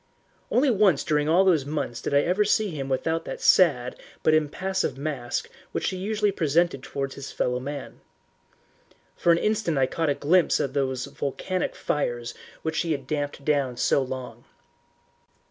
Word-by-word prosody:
Only 265 +2 +3
once 195 -8 +3
during 150 0 +1
all 180 +4 +5
those 170 -7 +4
months 140 -4 -3
did - - -3
I 140 0 +5
ever 185 +6 +2
see 210 -1 +1
him 140 -4 -5
without 160 +5 0
that - - -5
sad 135 -9 +3 0.2
but 155 - +4
impassive 180 +4 0
mask 140 -4 -3 0.3
which - - 0
he 185 - -5
usually 210 +2 0
presented 165 -4 +1
towards 135 0 -4
his 140 0 -8
fellow 125 0 -1
man. 140 +2 -7 1.1
For 170 - +3
an 165 - +5
instant 210 -5 0
I 135 - +4
caught 160 +4 -1
a 140 - +2
glimpse 170 +4 +3
of 135 - -1
those 130 -2 -1
volcanic 145 +6 -3
fires 120 -5 -2 0.3
which 160 0 -1
he 165 -2 0
had 140 -3 -5
damped 145 -1 -3
down 140 -5 +1
so 140 - +2
long. 130 -1 -6
150 Hz, 165 wpm, -25 LUFS, 135-180 Hz, 1.1 s, all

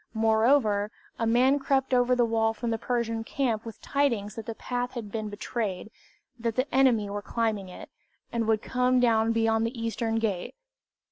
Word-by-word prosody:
Moreover, 220 -1 +3 0.3
a 230 - +1
man 255 +5 +4
crept 270 -1 0
over 250 0 +4
to - - +1
the 240 - +4
wall 225 -1 +1
from 235 +1 -3
the 225 - -1
Persian 230 -2 -1
camp 230 -3 -1
with 225 -2 -9
tidings 235 -8 0
that 225 -2 -8
the 230 - -4
path 245 +1 -3
had 225 -5 -6
been 215 -1 -3
betrayed, 210 -1 -4 0.5
that 230 -1 -2
the 255 - +1
enemy 250 -6 +4
were 205 +1 -4
climbing 215 -3 -2
it, 180 - -10 0.4
and 230 -2 -1
would 220 -1 +2
come 250 0 +2
down 225 -2 +3
beyond 225 0 +2
the 230 +1 -3
Eastern 230 0 -2
Gate. 215 -5 -2
230 Hz, 185 wpm, -27 LUFS, 220-245 Hz, 0.5 s, man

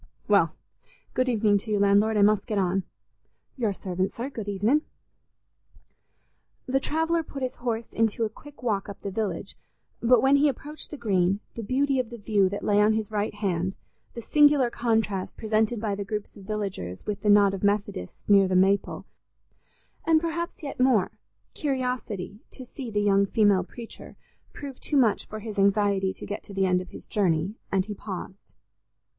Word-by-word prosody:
"Well, - - +3 0.6
good 255 0 +1
evening 210 -3 +3
to 215 - -10
you, 210 - +2
landlord; 205 +2 +3
I 205 - +5
must 210 -1 +3
get 210 - -1
on." 190 0 +1 0.7
"Your 230 -6 0
servant, 185 -1 -3
sir; 250 +4 -4
good 220 -5 -5
evenin'." 210 +10 +2 1.8
The 265 +1 +1
traveller 325 +4 0
put 280 -3 -7
his 255 - -3
horse 230 -2 -3
into 225 0 +1
a - - -2
quick 290 +4 -15
walk 205 -4 -1
up 200 - -8
the 200 - -3
village, 215 +1 -3 0.5
but 240 +1 +5
when 275 +1 +5
he 290 +1 +4
approached 295 +3 -7
the 300 - -7
Green, 195 -4 +1
the 230 - -5
beauty 265 +5 +1
of 250 -3 -2
the 240 - -8
view 205 -3 +2
that 200 +1 -5
lay 205 0 +3
on 215 +1 +4
his 220 -1 -2
right 205 0 -1
hand, 190 -3 -1 0.4
the 235 - -6
singular 290 -4 +4
contrast 220 -6 -1
presented 220 +1 +1
by 210 -2 -1
the 200 0 -3
groups 210 0 -5
of 200 -3 -13
villagers 195 - -4
with 210 -1 -3
the 210 - +1
knot 205 -1 +6
of 195 - -4
Methodists 200 - -1
near 200 -2 +6
the 185 - 0
maple, 195 +2 +2 1.0
and 320 -1 +5
perhaps 335 +1 -4
yet 280 -3 -6
more, 255 -7 +3 0.4
curiosity 250 - -3
to 260 - -10
see 250 0 -7
the 210 -1 0
young 200 -1 +3
female 205 -3 +3
preacher, 230 +5 -11 0.3
proved 275 -3 -9
too 295 - 0
much 235 -6 +2
for 215 0 -7
his 215 -2 -5
anxiety 200 -1 +3
to - - -9
get 205 - -5
to 200 - -12
the 195 0 +2
end 180 -1 +2
of 185 - -10
his - - -11
journey, 180 -2 0 0.2
and 190 -1 +1
he 210 - -5
paused. 190 -1 -8
210 Hz, 185 wpm, -26 LUFS, 195-245 Hz, 1.8 s, knot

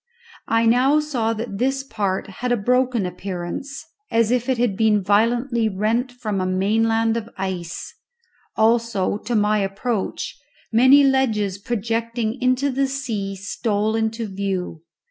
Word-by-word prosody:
I 225 0 +2
now 255 +6 +4
saw 255 -7 -1
that 220 -3 -5
this 270 +2 0
part 200 -7 -2 0.2
had 250 0 0
a 245 - +3
broken 245 0 +1
appearance 180 +8 -5 0.2
as 230 0 +2
if 250 +1 0
it 260 - +2
had 235 -4 +1
been 210 -1 +2
violently 230 +3 +2
rent 220 +6 0
from 215 -6 -3
a - - 0
mainland 225 +4 +1
of 230 0 -5
ice; 185 -3 -4 0.6
also, 220 -3 +1
to 235 +3 -3
my 210 0 +3
approach, 195 +5 -3 0.3
many 260 +5 +6
ledges 220 -8 +1
projecting 230 +2 -2
into 255 +2 +2
the 270 +1 +1
sea 225 -8 -3
stole 210 +2 -1
into 225 +1 -1
view. 190 -4 -3
225 Hz, 140 wpm, -22 LUFS, 200-245 Hz, 0.6 s, many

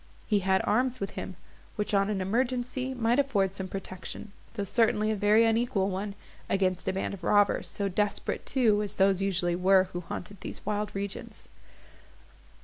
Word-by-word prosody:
He 210 -2 +2
had 190 0 +2
arms 250 +3 +1
with 195 - -3
him, 190 - -6 0.4
which, 210 0 -2
on 200 0 +3
an 200 -3 -1
emergency, 255 +5 -1
might 240 +2 +2
afford 205 -9 +1
some 190 -1 -5
protection, 190 +2 -7 0.2
though 205 - -2
certainly 215 +1 +2
a - - 0
very 210 +2 +4
unequal 225 -4 +1
one, 200 +2 -4 0.3
against 185 -2 0
a 190 - +1
band 195 - -2
of 190 -3 -9
robbers, 205 +2 +3
so 200 - -3
desperate 205 +2 -1
too 220 -6 +2
as 205 -1 -2
those 195 -1 +3
usually 180 -3 +1
were 185 +1 +4
who 175 - -3
haunted 180 +3 -7
these - - -7
wild 210 0 -1
regions. 200 0 -5
200 Hz, 170 wpm, -28 LUFS, 190-220 Hz, 0.4 s, very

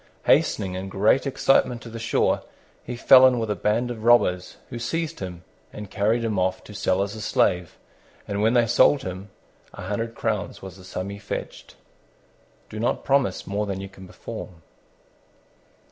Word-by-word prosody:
Hastening 95 -3 +2
in 95 +1 -5
great 105 +8 +2
excitement 130 -2 +2
to 115 - -9
the 115 0 -7
shore, 115 0 +1 0.4
he 125 - -6
fell 130 +2 +7
in 125 -1 +2
with 110 -2 -2
a - - 0
band 110 +6 0
of 110 -2 -7
robbers, 90 -7 +3
who 120 - -5
seized 165 +7 -3
him 90 -2 -7 0.3
and 105 -2 -9
carried 110 +3 +1
him 110 -4 -1
off 95 0 -1
to 105 - -12
sell 95 -1 +1
as 100 +2 -5
a 110 - -7
slave: 90 -5 0 0.5
and 100 0 -2
when 110 +3 +3
they 120 -1 +5
sold 135 +5 +4
him 95 +2 -6 0.5
a - - -8
hundred 115 +4 -3
crowns - - -2
was 95 0 -10
the 95 - -14
sum 95 +1 -5
he 100 - -8
fetched. 105 - -7 0.9
Do 110 - -8
not 115 - -1
promise 135 -8 +1
more 105 +1 -2
than 95 -1 -3
you 95 0 -7
can 95 0 -13
perform. 85 -2 -9
105 Hz, 180 wpm, -24 LUFS, 95-115 Hz, 0.9 s, fell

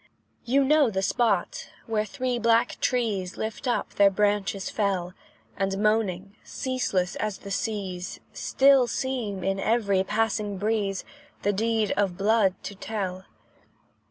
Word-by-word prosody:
You 270 +3 +3
know 295 -1 +4
the 190 -2 -2
spot, 205 -3 0 0.2
where 215 -1 0
three 255 0 -2
black 230 +1 +2
trees, 210 -7 0
Lift 220 +4 -4
up 245 - -1
their 200 -1 +5
branches 205 -1 0
fell, 190 -4 -1 0.4
And 195 0 -1
moaning, 205 -2 0
ceaseless 225 -9 -1
as 215 -2 -2
the 200 - -9
seas, 195 -4 -3
Still 270 -2 +4
seem, 235 -8 -3
in 195 0 0
every 200 -3 +2
passing 210 -1 -1
breeze, 205 -1 -1 0.4
The 205 - +2
deed 220 +1 +1
of 195 -3 +1
blood 200 -2 +3
to - - -5
tell. 190 -2 -4
210 Hz, 130 wpm, -26 LUFS, 195-230 Hz, 0.4 s, their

